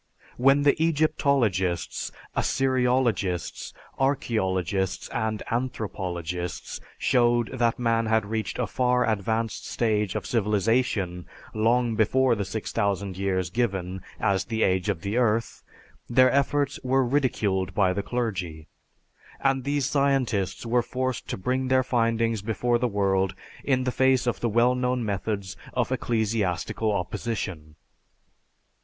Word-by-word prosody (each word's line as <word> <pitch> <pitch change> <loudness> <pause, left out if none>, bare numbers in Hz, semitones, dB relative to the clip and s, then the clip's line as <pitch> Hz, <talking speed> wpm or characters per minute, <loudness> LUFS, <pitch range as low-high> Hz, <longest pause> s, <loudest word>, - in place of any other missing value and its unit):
When 135 +3 +4
the 145 +2 +3
Egyptologists, 140 - +1 0.2
Assyriologists, 125 -8 0 0.3
archeologists, 95 -8 0
and 110 -2 -2
anthropologists 90 -8 -3 0.2
showed 120 -2 +2
that 115 0 +2
man 115 -2 +1
had 110 -1 +2
reached 110 +1 -3
a - - 0
far 125 -1 +1
advanced 110 +1 -1
stage 105 -4 0
of 105 -4 -3
civilization 105 -4 0 0.3
long 115 +2 +2
before 130 +4 +3
the 100 -3 -2
6000 100 -2 -2
years 95 -2 -1
given 95 -5 -1 0.2
as 95 -2 +1
the 110 -1 -1
age 95 +1 +1
of 95 -5 -1
the 100 +4 -2
earth, 115 -2 +1 0.5
their 130 +1 +5
efforts 140 0 +1
were 130 0 +2
ridiculed 105 -8 0
by 95 -4 +3
the 100 - -1
clergy, 95 -10 -3 0.7
and 135 -1 +1
these 140 -1 0
scientists 135 -9 0
were 120 +1 +2
forced 130 0 -3
to - - -3
bring 130 +6 -1
their 130 0 +3
findings 115 -3 +1
before 120 +3 0
the 125 - +1
world 95 -3 +1 0.3
in 130 -2 +1
the 125 - 0
face 130 0 +3
of 120 - -1
the 120 - 0
well 120 +3 +3
known 125 -1 0
methods 100 -1 -3 0.2
of - - 0
ecclesiastical 110 -2 0
opposition. 95 -5 -4
115 Hz, 125 wpm, -26 LUFS, 95-125 Hz, 0.7 s, their